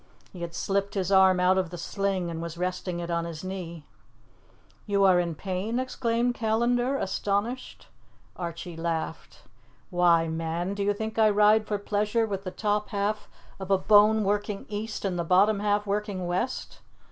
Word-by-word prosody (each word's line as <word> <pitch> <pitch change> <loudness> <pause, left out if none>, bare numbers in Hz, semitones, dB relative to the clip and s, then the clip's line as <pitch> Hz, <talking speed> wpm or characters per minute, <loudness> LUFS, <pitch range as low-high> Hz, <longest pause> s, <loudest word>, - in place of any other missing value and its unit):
He 180 - -9
had 170 0 -5
slipped 200 +2 -1
his 190 -1 -1
arm 190 -1 +6
out 185 +1 +4
of 185 -3 -2
the 175 - -7
sling 190 0 -2
and 165 0 -5
was 170 0 -6
resting 180 0 -3
it 170 0 -4
on 170 0 0
his 165 -1 -7
knee. 175 -4 -6 1.0
"You 200 -1 +2
are 185 -2 +6
in 170 -2 -1
pain?" 195 +7 -3
exclaimed 245 -2 0
Callandar, 240 +4 +1
astonished. 205 +4 -2 0.5
Archie 170 0 -6
laughed. 165 -1 -4 0.5
"Why, 170 -2 +4
man, 165 +3 -2
do 200 - -4
you 205 +1 +1
think 220 +1 -4
I 215 -1 +6
ride 210 +1 +4
for 210 - 0
pleasure 210 +2 0
with 200 -2 -4
the - - -2
top 210 +2 -1
half 205 +1 -2 0.3
of 190 -1 -7
a 195 - +4
bone 210 +2 +5
working 205 0 -1
east 215 0 -4
and 180 -3 -1
the - - 0
bottom 195 +5 +4
half 205 0 +1
working 200 -2 -2
west?" 185 +9 -3
195 Hz, 170 wpm, -27 LUFS, 175-210 Hz, 1.0 s, arm